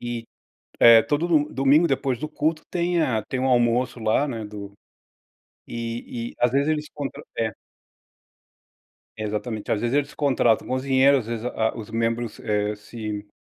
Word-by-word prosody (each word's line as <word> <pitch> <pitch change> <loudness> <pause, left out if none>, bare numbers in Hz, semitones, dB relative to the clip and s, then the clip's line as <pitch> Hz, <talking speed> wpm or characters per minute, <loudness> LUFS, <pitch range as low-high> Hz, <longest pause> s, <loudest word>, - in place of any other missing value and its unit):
e, 120 -1 -4 0.5
eh, 115 -1 +9
todo 150 +3 0
do 150 -3 +2
domingo 140 +5 +4
depois 135 -2 0
do 155 - -4
culto 155 +1 -1
tem 175 0 0
a 115 -7 0
tem 130 +3 -3
um 130 - +1
almoço 120 0 +2
lá, 110 +7 +1
né, 115 -4 -4
do 105 -1 -8 1.0
e 115 0 -5
e - - -17
às 120 - +4
vezes 140 +4 +1
eles 150 -1 0
contra 145 -3 -6 0.2
é. 110 -1 0 1.6
Exatamente, 110 0 -4
às 105 - 0
vezes 120 +5 0
eles 145 0 -1
contratam 130 -6 +2
cozinheiro, 130 +1 +3
às 115 - -6
vezes 115 -1 -4
a 110 -2 0
os 110 -2 -8
membros, 115 0 -2
eh, 105 -1 0
se 105 -1 -6
120 Hz, 160 wpm, -24 LUFS, 110-140 Hz, 1.6 s, eh